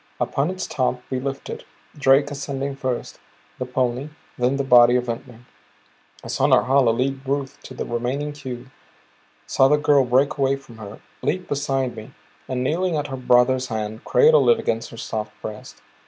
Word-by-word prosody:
Upon 140 +4 0
its 185 0 -4
top 130 -3 -1
we 130 - -1
lifted, 135 +1 -5 0.3
Drake 140 0 +3
ascending 140 -1 -4
first, 130 -3 -4 0.4
the 125 - -3
pony; 125 +2 -1 0.3
then 125 +2 +1
the 140 - 0
body 120 -2 +6
of 125 - +2
Ventnor. 115 0 -6 0.8
I - - -8
saw - - +1
Norhala 130 +3 +4
lead 130 +4 0
Ruth 135 0 -3
to 130 - -11
the - - -4
remaining 125 +5 -2
cube; 130 -3 -8 0.7
saw 135 - +4
the 150 +2 +4
girl 145 -2 +4
break 135 +4 +2
away 135 0 +2
from 125 -5 -14
her, 105 0 -10 0.2
leap 185 0 -1
beside 135 -3 -1
me, 110 - -11 0.3
and 125 -1 -2
kneeling 170 +5 0
at 145 -1 -3
her - - -1
brother's 125 0 +3
head, 110 -1 -4
cradle 475 +1 +5
it 470 - +6
against 115 0 -2
her 115 - -11
soft 110 -2 -5
breast. 105 0 -9
130 Hz, 170 wpm, -22 LUFS, 125-140 Hz, 0.8 s, body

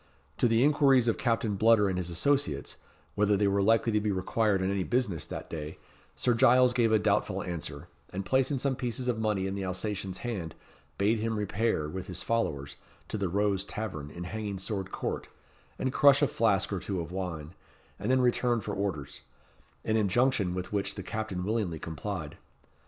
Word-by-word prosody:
To - - +4
the 115 +1 +3
inquiries 135 -4 +4
of 115 - +1
Captain 115 -4 +1
Bludder 110 0 +5
and 95 -1 -1
his 90 -1 -3
associates, 85 - 0 0.4
whether 105 0 +2
they 100 0 +2
were 100 0 +2
likely 115 +3 +3
to 105 -1 +2
be 105 0 0
required 100 +2 +1
on 95 - +1
any 100 -1 0
business 115 -7 -1
that - - -6
day, 75 -1 -6 0.4
Sir 125 - +2
Giles 125 +1 +5
gave 120 -3 +3
a 110 - +6
doubtful 100 -2 +1
answer, 80 -4 -6 0.2
and 95 +1 -4
placing 130 +5 +2
some 135 +1 0
pieces 125 0 -3
of 120 -3 0
money 105 -4 0
in 95 - -2
the 100 0 -3
Alsatian's 95 0 -3
hand, 95 -10 -4 0.4
bade 105 +3 +2
him 110 0 -1
repair, 105 -5 0
with 90 +3 -6
his 90 +1 -5
followers, 75 -12 -1 0.3
to - - -2
the 95 -3 0
"Rose 100 0 +1
Tavern," 95 -12 -5
in 85 +3 -7
Hanging 105 +1 -4
Sword 95 0 -4
Court, - - -3 0.5
and 130 -1 -1
crush 140 0 +6
a - - +5
flask 100 -5 +1
or 95 - -1
two 95 +1 -3
of 85 0 -5
wine, 90 -4 -5 0.5
and 105 - -3
then 130 0 +4
return 120 -1 +2
for 105 - -5
orders 90 -8 -3 0.6
an 110 - +2
injunction 105 -2 +2
with 95 +2 -5
which 100 -1 -1
the 100 - -6
captain 110 -3 -4
willingly 100 -5 -1
complied. 80 0 -5
100 Hz, 190 wpm, -29 LUFS, 95-115 Hz, 0.6 s, a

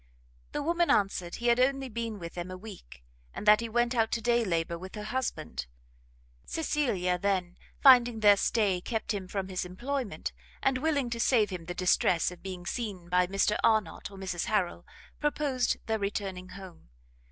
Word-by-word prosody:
The 290 - -2
woman 340 +2 +1
answered 190 -3 +1
he 240 - -7
had 240 0 +4
only 270 +1 +2
been 230 -2 -4
with 170 -2 -7
them 175 +1 -5
a 185 - -6
week, 185 - -12 0.3
and - - -6
that 210 0 +7
he 230 0 -4
went 240 +2 +1
out 225 -2 +1
to 235 - +1
day 240 +1 +2
labour 170 -4 -1
with 185 +3 -9
her 210 - -5
husband. 215 - -3 0.8
Cecilia 200 - 0
then, 185 -2 0 0.3
finding 245 -4 +7
their 205 -1 +7
stay 200 -3 +1
kept 225 +2 -2
him 195 -2 -4
from 195 0 -3
his 185 -1 -3
employment, 240 +6 -4 0.3
and 265 -1 +2
willing 285 -4 0
to 235 - -3
save 220 -3 +3
him 175 -3 -6
the 175 +1 -5
distress 180 -1 +2
of 180 - -12
being 185 -2 -7
seen 190 -4 -4
by 180 0 +3
Mr 195 +2 +1
Arnott 215 -6 +1
or 195 - -12
Mrs 185 -3 -3
Harrel, 195 -5 -1 0.3
proposed 290 -4 0
their 220 -1 -1
returning 195 -2 -3
home. 185 - -12
205 Hz, 180 wpm, -29 LUFS, 180-240 Hz, 0.8 s, that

